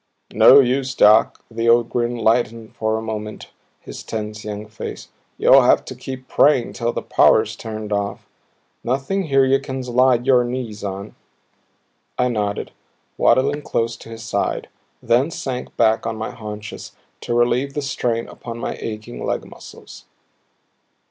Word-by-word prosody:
"No 140 Hz, -, +8 dB
use, 130 Hz, 0 st, -1 dB
Doc." 110 Hz, +2 st, +4 dB
The 115 Hz, +1 st, 0 dB
old 120 Hz, 0 st, +4 dB
grin 120 Hz, 0 st, -1 dB
lightened 115 Hz, 0 st, 0 dB
for 110 Hz, 0 st, -1 dB
a 110 Hz, -, -5 dB
moment 105 Hz, -1 st, -6 dB, 0.3 s
his -, -, -9 dB
tense 105 Hz, -1 st, -5 dB
young 105 Hz, 0 st, -6 dB
face. 110 Hz, +1 st, -8 dB, 0.3 s
"You'll -, -, +6 dB
have -, -, +3 dB
to -, -, -7 dB
keep 130 Hz, -1 st, -8 dB
praying 140 Hz, -5 st, +3 dB
till 120 Hz, 0 st, -1 dB
the -, -, -4 dB
power's 110 Hz, 0 st, +3 dB
turned 110 Hz, -2 st, -6 dB
off. 100 Hz, 0 st, -3 dB, 0.6 s
Nothing 135 Hz, +10 st, -1 dB
here 135 Hz, -3 st, +3 dB
you 135 Hz, +1 st, +3 dB
can 135 Hz, -1 st, -5 dB
slide 125 Hz, 0 st, +2 dB
your 130 Hz, -2 st, +4 dB
knees 120 Hz, -4 st, -5 dB
on." 100 Hz, +1 st, -5 dB, 1.0 s
I 125 Hz, 0 st, +2 dB
nodded, 105 Hz, -3 st, -2 dB, 0.4 s
waddling 140 Hz, +4 st, +2 dB
close 115 Hz, -4 st, -1 dB
to -, -, -13 dB
his 115 Hz, 0 st, -9 dB
side; 110 Hz, -, -2 dB, 0.3 s
then 120 Hz, +6 st, +2 dB
sank 130 Hz, -6 st, -5 dB
back 110 Hz, 0 st, +2 dB
on 115 Hz, -, -2 dB
my 110 Hz, -, -4 dB
haunches 105 Hz, -2 st, -8 dB, 0.3 s
to 120 Hz, -, -3 dB
relieve 125 Hz, +3 st, +1 dB
the 145 Hz, -, -2 dB
strain 120 Hz, -4 st, -2 dB
upon 115 Hz, -1 st, -8 dB
my 115 Hz, -, -4 dB
aching 110 Hz, +2 st, -6 dB
leg -, -, -2 dB
muscles. -, -, -13 dB
115 Hz, 155 wpm, -20 LUFS, 110-130 Hz, 1.0 s, No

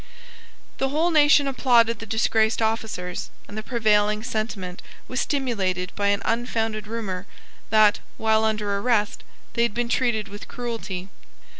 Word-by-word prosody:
The 270 Hz, -, +1 dB
whole 320 Hz, +5 st, +1 dB
nation 295 Hz, -2 st, +5 dB
applauded 235 Hz, -4 st, +3 dB
the 225 Hz, -, -8 dB
disgraced 220 Hz, 0 st, +2 dB
officers; 220 Hz, -5 st, -2 dB, 0.2 s
and 205 Hz, -, -10 dB
the 215 Hz, -, -3 dB
prevailing 215 Hz, -2 st, +2 dB
sentiment 215 Hz, -6 st, -4 dB, 0.3 s
was 255 Hz, -, -1 dB
stimulated 195 Hz, -10 st, -1 dB
by 200 Hz, -1 st, 0 dB
an 200 Hz, 0 st, +1 dB
unfounded 225 Hz, -2 st, -1 dB
rumour 200 Hz, -4 st, -4 dB, 0.4 s
that, 215 Hz, -1 st, +5 dB, 0.2 s
while 220 Hz, 0 st, +2 dB
under 210 Hz, -2 st, 0 dB
arrest, 210 Hz, -2 st, 0 dB, 0.3 s
they 235 Hz, -, 0 dB
had 235 Hz, -3 st, +1 dB
been 240 Hz, 0 st, -1 dB
treated 235 Hz, -5 st, +1 dB
with 205 Hz, +1 st, -9 dB
cruelty. 225 Hz, -6 st, -5 dB
220 Hz, 140 wpm, -24 LUFS, 205-235 Hz, 0.4 s, nation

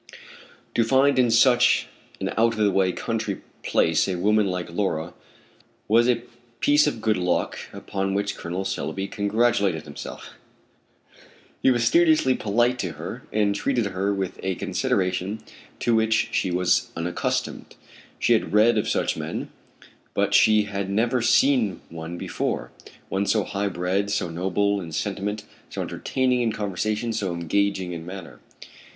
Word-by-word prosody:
To 115 Hz, -, +3 dB
find 135 Hz, +3 st, +3 dB
in 125 Hz, -2 st, +4 dB
such 125 Hz, +1 st, +4 dB, 0.3 s
an -, -, -2 dB
out 115 Hz, +1 st, +2 dB
of 110 Hz, -2 st, +1 dB
the 100 Hz, -, +3 dB
way 95 Hz, -1 st, +2 dB
country -, -, -3 dB, 0.2 s
place 80 Hz, -1 st, +2 dB
a 95 Hz, -, -1 dB
woman 105 Hz, +3 st, +3 dB
like 90 Hz, -2 st, -3 dB
Laura 85 Hz, -3 st, -2 dB, 0.7 s
was 115 Hz, +3 st, +4 dB
a 120 Hz, -1 st, +1 dB, 0.4 s
piece 145 Hz, +3 st, +4 dB
of 115 Hz, -7 st, -2 dB
good 110 Hz, -1 st, +2 dB
luck 90 Hz, -1 st, -1 dB
upon 95 Hz, 0 st, -3 dB
which 100 Hz, 0 st, -1 dB
Col. 90 Hz, +3 st, -4 dB
Selby 95 Hz, +2 st, -3 dB
congratulated 100 Hz, -5 st, +1 dB
himself. 75 Hz, -2 st, -9 dB, 1.3 s
He -, -, +4 dB
was 120 Hz, -2 st, +2 dB
studiously 155 Hz, 0 st, +4 dB
polite 120 Hz, +3 st, +1 dB
to 90 Hz, -8 st, -3 dB
her -, -, -8 dB
and 105 Hz, -1 st, +2 dB
treated 120 Hz, +1 st, 0 dB
her 100 Hz, +1 st, -1 dB
with 95 Hz, -2 st, -3 dB
a 95 Hz, -1 st, -1 dB
consideration 95 Hz, +4 st, -1 dB, 0.4 s
to 120 Hz, -, +2 dB
which 110 Hz, 0 st, +2 dB
she 95 Hz, -, 0 dB
was 90 Hz, 0 st, +1 dB
unaccustomed. 85 Hz, +1 st, -3 dB, 0.4 s
She -, -, +3 dB
had -, -, 0 dB
read 110 Hz, +1 st, +5 dB
of -, -, -2 dB
such -, -, 0 dB
men, -, -, -5 dB, 0.7 s
but -, -, +1 dB
she 110 Hz, -1 st, +5 dB
had 100 Hz, -1 st, -4 dB
never 115 Hz, +5 st, +1 dB
seen 120 Hz, -4 st, +3 dB
one 80 Hz, +1 st, -6 dB
before, -, -, -3 dB, 0.4 s
one 100 Hz, +1 st, -1 dB
so 110 Hz, -2 st, +2 dB
high 100 Hz, +1 st, -2 dB
bred, 95 Hz, +3 st, -1 dB
so 100 Hz, -3 st, -1 dB
noble 95 Hz, +4 st, 0 dB
in 80 Hz, -3 st, -8 dB
sentiment, 105 Hz, +3 st, -3 dB, 0.3 s
so -, -, -4 dB
entertaining 125 Hz, -1 st, 0 dB
in 115 Hz, -2 st, +1 dB
conversation, 110 Hz, +3 st, -2 dB
so 100 Hz, -5 st, -2 dB
engaging 95 Hz, +2 st, 0 dB
in 85 Hz, -1 st, -6 dB
manner. 90 Hz, 0 st, -9 dB
100 Hz, 150 wpm, -24 LUFS, 90-115 Hz, 1.3 s, read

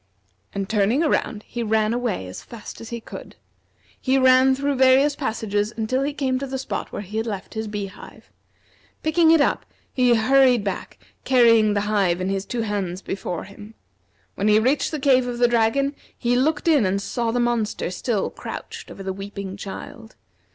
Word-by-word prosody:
And 195 Hz, -1 st, -3 dB
turning 215 Hz, +8 st, +2 dB
around, 240 Hz, -8 st, 0 dB
he 240 Hz, -, -6 dB
ran 220 Hz, 0 st, +1 dB
away 240 Hz, -, -2 dB
as 90 Hz, -, -8 dB
fast 230 Hz, -3 st, -10 dB
as 230 Hz, -, -9 dB
he 235 Hz, -, -5 dB
could. -, -, -10 dB, 0.7 s
He 265 Hz, 0 st, +2 dB
ran 260 Hz, 0 st, +5 dB
through 280 Hz, +1 st, -1 dB
various 265 Hz, +2 st, +4 dB
passages 215 Hz, -2 st, -2 dB
until 230 Hz, +4 st, 0 dB
he 280 Hz, +2 st, 0 dB
came 265 Hz, -3 st, -1 dB
to 275 Hz, -, -4 dB
the 265 Hz, 0 st, -4 dB
spot 220 Hz, -7 st, -4 dB
where 205 Hz, -, -5 dB
he 210 Hz, +3 st, -6 dB
had 225 Hz, +1 st, -1 dB
left 200 Hz, -3 st, -5 dB
his 220 Hz, -1 st, -4 dB
bee 205 Hz, -1 st, -3 dB
hive. 195 Hz, 0 st, -13 dB, 0.7 s
Picking 320 Hz, +1 st, +3 dB
it 325 Hz, -2 st, +6 dB
up, -, -, +1 dB, 0.3 s
he 250 Hz, -2 st, +4 dB
hurried 250 Hz, 0 st, +4 dB
back, 195 Hz, -2 st, -5 dB, 0.3 s
carrying 230 Hz, -4 st, +4 dB
the 205 Hz, -, +1 dB
hive 200 Hz, -4 st, +1 dB
in 185 Hz, +1 st, -2 dB
his 195 Hz, 0 st, -2 dB
two 240 Hz, -2 st, -2 dB
hands 195 Hz, -4 st, -3 dB
before 185 Hz, -2 st, -4 dB
him. 205 Hz, +2 st, -13 dB, 0.6 s
When 200 Hz, -, -1 dB
he 210 Hz, 0 st, +5 dB
reached 260 Hz, +6 st, +1 dB
the 310 Hz, -, -4 dB
cave 260 Hz, -2 st, +3 dB
of 245 Hz, -1 st, -4 dB
the 240 Hz, 0 st, +4 dB
dragon, 240 Hz, +5 st, +1 dB, 0.2 s
he 245 Hz, 0 st, +1 dB
looked 295 Hz, +5 st, +1 dB
in 300 Hz, -7 st, +5 dB
and 190 Hz, +1 st, +1 dB
saw 235 Hz, +3 st, -2 dB
the 240 Hz, +2 st, 0 dB
monster 235 Hz, -6 st, -1 dB
still 205 Hz, +3 st, -2 dB
crouched 455 Hz, 0 st, -8 dB
over 195 Hz, -, -9 dB
the 190 Hz, 0 st, -3 dB
weeping 195 Hz, 0 st, -7 dB
child. 220 Hz, +3 st, -9 dB
230 Hz, 190 wpm, -23 LUFS, 205-260 Hz, 0.7 s, it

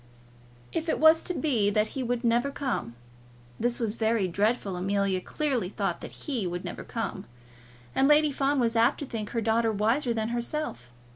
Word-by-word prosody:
If 330 Hz, 0 st, -2 dB
it -, -, +1 dB
was 315 Hz, +1 st, +6 dB
to 360 Hz, -, -1 dB
be 240 Hz, -12 st, +2 dB
that 210 Hz, +1 st, +1 dB
"he" 270 Hz, -, -4 dB
would 245 Hz, 0 st, -1 dB
never 240 Hz, +3 st, +2 dB
come, 260 Hz, -, -3 dB, 0.6 s
this 240 Hz, +1 st, 0 dB
was 225 Hz, -3 st, -1 dB
very 220 Hz, -3 st, +1 dB
dreadful. 200 Hz, +2 st, 0 dB
Amelia 195 Hz, 0 st, 0 dB
clearly 265 Hz, -, -1 dB
thought -, -, -2 dB
that -, -, -9 dB
"he" 245 Hz, -, -1 dB
would 175 Hz, 0 st, -4 dB
never -, -, -6 dB
come, -, -, -4 dB, 0.7 s
and 270 Hz, -, +3 dB
Lady 300 Hz, 0 st, +5 dB
Fawn 275 Hz, +1 st, +1 dB
was 235 Hz, -1 st, +1 dB
apt 230 Hz, +4 st, +4 dB
to -, -, -2 dB
think 220 Hz, -5 st, -5 dB
her 230 Hz, -, -1 dB
daughter 225 Hz, +1 st, +2 dB
wiser 230 Hz, +6 st, +1 dB
than 220 Hz, -1 st, -1 dB
herself. 240 Hz, -, -3 dB
235 Hz, 185 wpm, -28 LUFS, 210-275 Hz, 0.7 s, was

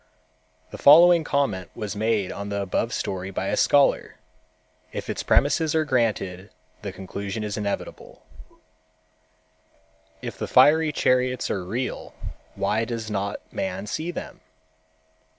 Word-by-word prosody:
The -, -, -9 dB
following 170 Hz, +3 st, +7 dB
comment 120 Hz, -, -1 dB
was 105 Hz, -4 st, -5 dB
made 105 Hz, -2 st, 0 dB
on 100 Hz, 0 st, -6 dB
the 100 Hz, 0 st, -2 dB
above 100 Hz, +4 st, -1 dB
story 95 Hz, -3 st, -3 dB
by 95 Hz, 0 st, -3 dB
a -, -, +1 dB
scholar. 140 Hz, -1 st, +3 dB, 0.8 s
If -, -, -4 dB
its -, -, -4 dB
premises 155 Hz, +2 st, +2 dB
are 160 Hz, -1 st, +2 dB
granted, 105 Hz, -8 st, -1 dB, 0.3 s
the 100 Hz, -, -5 dB
conclusion 100 Hz, +3 st, -5 dB
is 105 Hz, -1 st, -3 dB
inevitable: 100 Hz, -2 st, -5 dB, 2.0 s
"If -, -, -7 dB
the -, -, -3 dB
fiery 160 Hz, +1 st, +5 dB
chariots 125 Hz, -3 st, +1 dB
are 90 Hz, -1 st, -4 dB
seal, 125 Hz, +3 st, -4 dB, 0.4 s
why 110 Hz, +2 st, 0 dB
does 115 Hz, -2 st, -5 dB
not 100 Hz, -1 st, -3 dB
man 95 Hz, +1 st, -3 dB
see 155 Hz, +10 st, -4 dB
them? 175 Hz, -, -7 dB
110 Hz, 130 wpm, -24 LUFS, 100-140 Hz, 2.0 s, following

